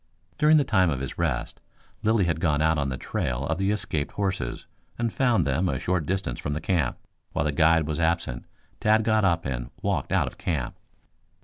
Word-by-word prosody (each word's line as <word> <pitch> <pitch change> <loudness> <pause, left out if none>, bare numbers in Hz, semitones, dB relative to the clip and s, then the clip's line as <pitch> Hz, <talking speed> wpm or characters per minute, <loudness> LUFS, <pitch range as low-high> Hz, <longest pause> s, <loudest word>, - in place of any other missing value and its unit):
During 155 +1 +6
the 145 - +4
time 95 -8 +3
of 70 -4 -1
his 70 +4 -6
rest 70 -8 -2 0.4
Lilly 110 -3 +3
had 80 -2 0
gone 75 -4 +1
out 80 0 +2
on 70 -1 0
the 65 - -3
trail 65 +1 -2
of 80 +3 -1
the 95 0 +1
escaped 90 -8 -1
horses, 95 -12 -2 0.3
and 115 -2 -1
found 120 - +2
them 75 +7 +1
a - - -1
short 90 -4 -1
distance 95 -10 -2
from 75 - -3
the 75 - -2
camp. 80 -6 0 0.4
While - - 0
the 75 - +1
guide 80 +2 +4
was 80 +1 -2
absent, 80 -7 0 0.3
Tad 110 +1 +3
got 110 -1 +2
up 85 -3 +2
and 65 -3 -3
walked - - -1
out - - +3
of - - -8
camp. 75 -8 -2
80 Hz, 205 wpm, -26 LUFS, 70-95 Hz, 0.4 s, During